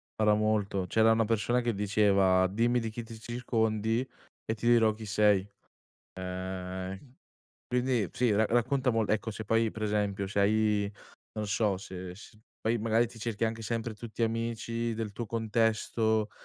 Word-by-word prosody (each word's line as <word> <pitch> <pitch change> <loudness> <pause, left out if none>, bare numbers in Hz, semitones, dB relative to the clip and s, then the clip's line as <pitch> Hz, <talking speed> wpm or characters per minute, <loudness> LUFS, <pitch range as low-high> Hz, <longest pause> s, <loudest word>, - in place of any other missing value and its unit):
parla 105 -1 +3
molto, 105 -3 0
c'era 110 +4 +4
una 115 0 +3
persona 115 +3 +1
che 120 -1 0
diceva: 100 -2 +3
"Dimmi 115 +5 +1
di 115 -1 -3
chi 115 +2 -6
ti 110 0 -10
circondi 115 0 -1 0.4
e 110 - -1
ti 115 +1 -3
dirò 115 -2 +5
chi 110 +1 -9
sei" 105 -2 +3 0.7
ehm, 95 +1 -5 0.7
quindi 125 -5 0
sì 120 -3 +2
ra 110 +2 +3
racconta 125 +3 +1
mol 115 -2 0
ecco, 110 +1 0
se 110 +1 -7
poi 115 +1 +2
pre 110 -1 -3
esempio, 100 -2 -1
se 100 +1 -1
hai 105 0 +2 0.4
non 105 -1 -3
so 100 -1 +1
se 90 -1 -8
se 105 +1 -14 0.2
poi 115 +2 +1
magari 115 +1 +2
ti 115 0 -13
cerchi 115 0 -1
anche 115 0 -3
sempre 115 0 -2
tutti 115 +1 -4
amici 115 0 -2
del 110 -1 -4
tuo 120 - -4
contesto, 110 0 +1
110 Hz, 165 wpm, -30 LUFS, 105-115 Hz, 0.7 s, dirò